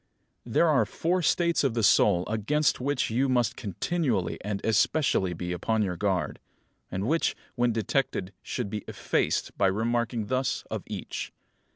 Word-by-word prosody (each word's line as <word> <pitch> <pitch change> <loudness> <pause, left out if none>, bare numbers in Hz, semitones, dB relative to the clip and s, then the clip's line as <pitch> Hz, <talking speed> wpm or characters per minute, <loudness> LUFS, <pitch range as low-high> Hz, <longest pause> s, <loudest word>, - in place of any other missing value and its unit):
19. 115 - -8
There 170 - +5
are 140 -8 +4
four 175 - -1
states 170 -1 +2
of 130 -4 +1
the 115 - 0
soul 95 -2 +4
against 125 +8 +1
which 140 -2 0
you 130 +4 +1
must 120 -3 +2
continually 120 - -1
and 105 0 -2
especially 110 - +2
be 90 +2 -4
upon 110 +5 0
your 90 -3 -2
guard; 90 -5 -1 0.5
and 95 +3 -3
which, 165 +4 +1 0.2
when 120 0 +2
detected, 110 -3 -1
should 115 -6 -4
be 105 -2 -4
effaced, - - -1
by 100 - +5
remarking 115 +3 0
thus 130 +4 -1
of - - -2
each. - - -5
115 Hz, 160 wpm, -27 LUFS, 100-135 Hz, 0.5 s, There